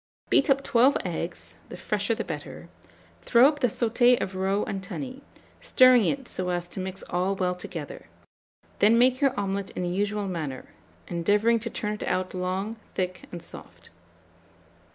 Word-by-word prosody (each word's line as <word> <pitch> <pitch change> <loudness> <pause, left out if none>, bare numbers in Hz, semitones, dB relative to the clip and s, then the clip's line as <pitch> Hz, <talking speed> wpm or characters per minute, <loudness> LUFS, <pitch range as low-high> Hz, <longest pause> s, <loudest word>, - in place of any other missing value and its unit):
Beat 275 - +4
up 275 0 +3
12 250 +3 +4
eggs - - -5
(the - - -8
fresher - - -1
the - - -3
better); - - -7 0.5
throw 245 +2 +6
up 290 0 -1
the 250 - +3
sauté 240 +2 +3
of 190 - -3
roe 190 +2 0
and 195 - -4
tunny, 260 +7 -6 0.4
stirring 255 -4 +6
it 270 +5 -1
so 185 -1 -3
as 175 -1 -2
to - - -6
mix 190 0 -5
all 185 +3 -1
well 185 -1 0
together; 340 - -8 0.7
then 220 +3 +5
make 255 +2 +3
your 270 -4 +2
omelet 195 0 -2
in - - -2
the 175 - -1
usual 205 +2 -1
manner, 155 -8 -5 0.4
endeavouring 205 +7 +2
to 235 +2 -5
turn 210 -1 -3
it 210 - -6
out 185 0 -1
long, 190 +4 -3 0.2
thick, 185 -1 -3
and 175 -1 -8
soft. - - -13
205 Hz, 170 wpm, -26 LUFS, 185-245 Hz, 0.7 s, throw